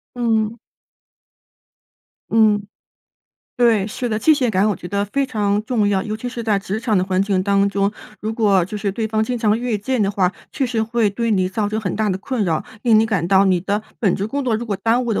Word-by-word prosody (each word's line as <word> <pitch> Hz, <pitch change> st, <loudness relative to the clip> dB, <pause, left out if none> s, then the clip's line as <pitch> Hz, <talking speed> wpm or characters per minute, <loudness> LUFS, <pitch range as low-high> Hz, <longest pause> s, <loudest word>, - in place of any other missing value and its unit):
嗯。 225 Hz, -2 st, 0 dB, 1.7 s
嗯， 215 Hz, -2 st, +4 dB, 1.0 s
对， 230 Hz, -5 st, +3 dB
是 245 Hz, +3 st, -3 dB
的。 215 Hz, -, -1 dB
界 310 Hz, +8 st, +4 dB
限 265 Hz, -5 st, +1 dB
感 200 Hz, +1 st, +2 dB
我 205 Hz, -, 0 dB
觉 175 Hz, -, -9 dB
得 200 Hz, +2 st, -1 dB
非 275 Hz, +6 st, -1 dB
常 210 Hz, -5 st, 0 dB
重 220 Hz, -3 st, +1 dB
要， 195 Hz, -2 st, +1 dB
尤 215 Hz, 0 st, -4 dB
其 245 Hz, +3 st, -5 dB
是 240 Hz, -1 st, -5 dB
在 210 Hz, -3 st, +2 dB
职 200 Hz, +1 st, -4 dB
场 220 Hz, -2 st, 0 dB
的 180 Hz, -, +3 dB
环 185 Hz, 0 st, 0 dB
境 195 Hz, -2 st, +1 dB
当 200 Hz, 0 st, +2 dB
中。 200 Hz, 0 st, 0 dB, 0.3 s
如 220 Hz, +1 st, -3 dB
果 205 Hz, -5 st, +3 dB
就 205 Hz, +4 st, -6 dB
是 200 Hz, -1 st, -2 dB
对 220 Hz, +2 st, -2 dB
方 220 Hz, 0 st, 0 dB
经 245 Hz, +2 st, -2 dB
常 220 Hz, -1 st, +1 dB
越 240 Hz, -2 st, -1 dB
界 245 Hz, +5 st, -2 dB
的 200 Hz, -2 st, +2 dB
话， 190 Hz, -2 st, +1 dB, 0.2 s
确 275 Hz, -, -1 dB
实 235 Hz, -3 st, -1 dB
会 225 Hz, -2 st, +1 dB
对 230 Hz, +3 st, -2 dB
你 185 Hz, -2 st, +1 dB
造 205 Hz, +2 st, -1 dB
成 215 Hz, +1 st, -2 dB
很 185 Hz, -3 st, -3 dB
大 215 Hz, -1 st, 0 dB
的 185 Hz, -, 0 dB
困 230 Hz, 0 st, -2 dB
扰， 160 Hz, -3 st, -1 dB, 0.2 s
令 225 Hz, -3 st, +5 dB
你 220 Hz, -, +4 dB
感 200 Hz, -7 st, -1 dB
到 195 Hz, +2 st, +4 dB
你 185 Hz, -2 st, +2 dB
的 205 Hz, +3 st, -1 dB, 0.2 s
本 200 Hz, -6 st, +2 dB
职 200 Hz, -, -2 dB
工 280 Hz, +3 st, -2 dB
作 235 Hz, -, +1 dB
如 235 Hz, -, -4 dB
果 210 Hz, -4 st, -2 dB
耽 230 Hz, +5 st, +1 dB
误 235 Hz, -, -1 dB
的 -, -, 0 dB
215 Hz, 255 characters per minute, -20 LUFS, 200-230 Hz, 1.7 s, 令